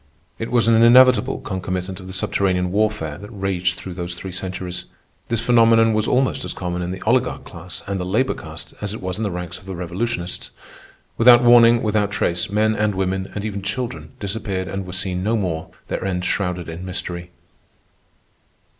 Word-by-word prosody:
It 115 - -3
was 120 -2 +3
an 115 -1 +5
inevitable 125 +2 +6
concomitant 95 -1 -4
of 95 - -10
the - - -7
subterranean 90 -1 0
warfare 105 -7 0
that 100 +1 -10
raged 95 -3 -1
through 95 - -7
those 85 0 -4
three 95 +1 -7
centuries. 90 0 -5 0.4
This 115 -1 -1
phenomenon 115 -1 +5
was 110 +1 +1
almost 130 +1 +1
as 90 - -3
common 90 -1 -3
in 90 - -3
the 95 - -5
oligarch - - +1
class - - -10
and 100 -1 -3
the - - -2
labor 105 +9 +1
castes, - - -9
as 105 0 -2
it - - -7
was 95 +2 -3
in - - -1
the 105 - 0
ranks 90 -2 -6
of 95 - -18
the 95 - -5
revolutionists. 90 +2 -3 0.7
Without 120 +1 +8
warning, 120 -1 +7
without 105 -1 +1
trace, 90 -3 0
men 110 +2 +2
and 105 -2 0
women, 95 0 -1
and 105 0 -3
even 100 -2 -3
children, 100 -7 -4
disappeared 100 -2 -3
and 95 -1 -4
were - - -6
seen 90 0 -2
no 110 +4 +1
more, 85 -6 -2 0.2
their - - -3
end 90 -2 -2
shrouded 90 -3 -1
in 85 +2 -7
mystery. 90 -1 -5
95 Hz, 190 wpm, -21 LUFS, 90-110 Hz, 0.7 s, Without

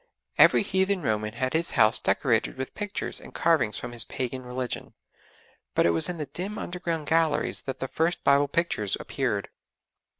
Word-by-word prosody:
Every - - +7
heathen 190 -1 +1
Roman 105 -1 -1
had 130 +2 -2
his 165 +1 +1
house 110 -1 +6
decorated 120 -1 +1
with 130 0 -5
pictures 205 -1 -4
and - - -13
carvings 140 -11 +2
from 125 - -6
his 120 -2 +1
pagan 130 +3 -4
religion, 125 0 -5 0.8
but - - +3
it 85 - +4
was 80 - +2
in 175 - -4
the 150 - -3
dim 185 +9 -5
underground 170 -3 -3
galleries 160 -1 +1
that 135 - -6
the 135 - -3
first 165 +5 -1
Bible 140 +1 +4
pictures 140 - -1
appeared. - - -2
140 Hz, 170 wpm, -26 LUFS, 120-170 Hz, 0.8 s, Every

